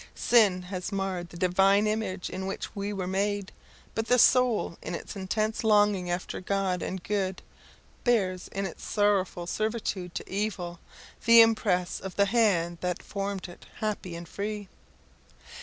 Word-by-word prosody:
Sin 205 -6 +4
has 180 +1 -5
marred 190 -3 -2
the 175 - -11
Divine 195 +3 +4
image 210 -4 -2
in 190 +1 -4
which 195 - -5
we 200 0 -3
were 195 -3 -3
made, 200 +1 -1 0.4
but 225 +1 -2
the 250 - +4
soul 245 -7 +4
in - - -4
its - - -7
intense 215 +4 -1
longing 205 -4 +3
after 175 +2 -3
God 190 -1 0
and 185 -1 -4
good 190 -3 -2 0.6
bears, 190 -7 +1
in 195 0 -3
its 180 - -7
sorrowful 200 -4 +1
servitude 210 -3 -2
to - - -5
evil, 190 -4 -3 0.5
the 230 0 +9
impress 205 -6 +2
of 190 -1 -7
the 200 - +4
hand 195 -6 +2
that 180 -1 -2
formed 195 -1 -4
it 175 - -13
happy 205 -5 -3
and 170 0 -8
free. 205 0 -5
195 Hz, 155 wpm, -28 LUFS, 180-210 Hz, 0.6 s, the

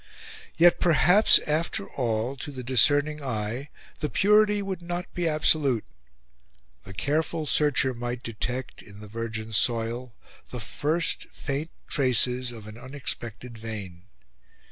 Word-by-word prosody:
Yet 175 +1 +6
perhaps, 180 +6 +6
after 165 +7 -1
all, 120 0 -2
to 140 - -6
the 130 -3 -7
discerning 145 +5 +3
eye, 120 +2 -3 0.3
the 150 - -2
purity 210 +2 +3
would 190 -2 -4
not 175 +1 -4
be 175 -1 -1
absolute. 150 -6 +2 1.0
The 95 - -10
careful 155 - -1
searcher 145 -3 +2
might 120 +1 -5
detect, 125 +3 -4
in 100 -1 -14
the 105 - -10
virgin 110 0 -5
soil, 115 +2 0 0.3
the 125 - -6
first 155 +9 -2
faint 145 +3 -4 0.2
traces 125 -2 +2
of 115 -3 -10
an 110 +2 -10
unexpected 125 -3 -5
vein. 100 -6 -7
130 Hz, 125 wpm, -26 LUFS, 115-155 Hz, 1.0 s, Yet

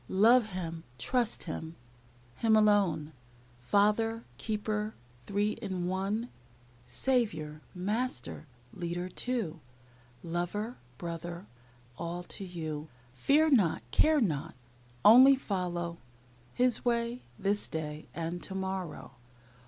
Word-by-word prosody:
Love 230 +2 +6
Him, 165 -3 -5
trust 235 - 0
Him, 160 -1 -5 0.6
Him 225 -1 +4
alone; 195 -8 +3 0.5
Father, 210 - +2 0.2
Keeper, 215 0 -2 0.3
Three 205 +1 +1
in 190 -6 -3
One. 195 +6 -1 0.6
Saviour, 160 -13 0
Master, 210 -2 -2 0.3
Leader, 175 +1 -3
too; 200 -6 -2 0.6
Lover, 175 +7 -2 0.2
Brother, 170 +2 -5 0.5
ALL 170 +1 -3
to 195 - -6
you. 160 -4 -5 0.3
Fear 295 - +3
not, 195 - +3
care 310 -1 +4
not, 155 - -1 0.5
Only 260 +5 +10
follow 175 -8 -3 0.6
His 250 -1 +4
way, 235 0 0 0.2
this 205 +1 0
day, 155 -1 -5
And 170 +1 -3
to 190 - -6
morrow. 190 -7 -4
190 Hz, 100 wpm, -31 LUFS, 170-225 Hz, 0.6 s, Only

